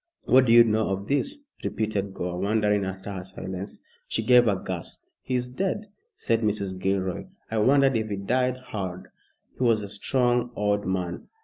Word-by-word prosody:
"What 130 0 +6
do - - +4
you 120 0 +9
know 110 -1 +1
of 95 +1 -3
this?" 280 - -1 0.2
repeated 100 -3 -2
Gore, 90 0 -3
wondering 105 0 +2
at 95 0 -6
her 95 -2 -5
silence. 95 +1 -7 0.2
She - - -1
gave 125 -1 +6
a 100 - +3
gasp. 90 -3 -5 0.2
"He 130 - -2
is 125 0 0
dead," 195 - -2 0.3
said 115 0 0
Mrs. 100 -3 -1
Gilroy. 95 -1 -1 0.3
"I 110 - +1
wonder 135 +5 +5
if 115 -5 +1
he 100 - -1
died 125 +6 0
hard. 95 -7 -6 0.5
He - - +1
was 115 -3 +3
a - - -5
strong 120 +3 +1
old 105 -1 0
man." 90 -2 -2
105 Hz, 180 wpm, -26 LUFS, 95-125 Hz, 0.5 s, you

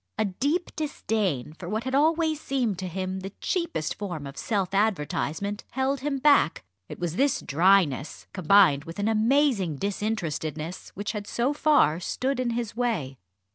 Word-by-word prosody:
A 215 - +2
deep 285 - -1
disdain 210 - -2
for 170 +2 -8
what 215 +3 -2
had 260 +1 -4
always 315 +1 +2
seemed 240 -9 -1
to 190 - -3
him 185 +1 -3
the 190 +1 -7
cheapest 335 - -1
form 175 -8 -5
of 140 0 -8
self 195 - -1
advertisement, 200 0 -1
held 265 +1 0
him 280 +1 -2
back. 280 - +4 0.3
It - - -7
was 175 0 -3
this 275 0 +2
dryness, 160 -3 +2
combined 180 -5 +5
with 165 0 -8
an 205 +1 0
amazing 225 - +2
disinterestedness, 170 -4 -3
which 205 +1 -3
had 210 -2 -5
so 250 +4 0
far 290 - +3
stood 260 +8 -2
in 250 -1 0
his 235 -2 -3
way. 190 - -2
205 Hz, 160 wpm, -26 LUFS, 175-260 Hz, 0.3 s, combined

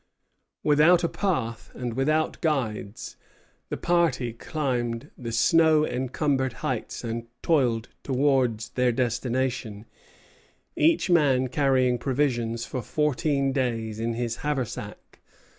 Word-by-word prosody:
Without 155 +4 +5
a - - +3
path 130 - -2
and 120 -2 -4
without 155 +5 0
guides, 115 -9 -2 0.5
the - - -3
party 160 -9 +1
climbed 120 -3 -3
the 115 -2 -6
snow 155 +6 +4
encumbered 130 0 -1
heights - - -3
and 115 0 -4 0.2
toiled 125 -8 +2
towards 130 -5 +1
their 125 -1 +1
destination, 120 -2 -2 0.9
each 320 - +3
man 135 -6 +3
carrying 130 -3 +2
provisions 120 -4 0
for 130 - -4
fourteen 145 -1 0
days 115 -5 -2
in 115 0 -1
his 120 -1 -2
haversack. 140 -6 -4
130 Hz, 110 wpm, -26 LUFS, 115-150 Hz, 0.9 s, Without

